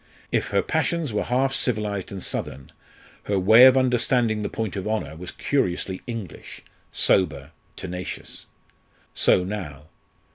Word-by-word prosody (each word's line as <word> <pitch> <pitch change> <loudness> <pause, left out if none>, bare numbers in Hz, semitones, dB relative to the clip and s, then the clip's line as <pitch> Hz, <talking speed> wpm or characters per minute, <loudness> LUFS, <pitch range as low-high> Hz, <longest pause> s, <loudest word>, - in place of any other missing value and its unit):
If - - 0
her - - +1
passions 165 -8 -1
were 105 - -1
half 130 +2 +1
civilised 105 -7 -2
and 95 -2 -6
southern, 65 +1 -4 0.5
her 100 - 0
way 110 +7 +8
of 130 0 +5
understanding 125 -3 +2
the 105 - -2
point 110 -4 -4
of 95 0 -4
honour 110 -8 -2
was 85 +2 -8
curiously 95 -8 -1
English, 115 -8 -7 0.3
sober, 70 -6 +1 0.2
tenacious. 90 -1 -7 0.7
So 90 - +3
now. 80 -7 -6
105 Hz, 135 wpm, -24 LUFS, 90-120 Hz, 0.7 s, way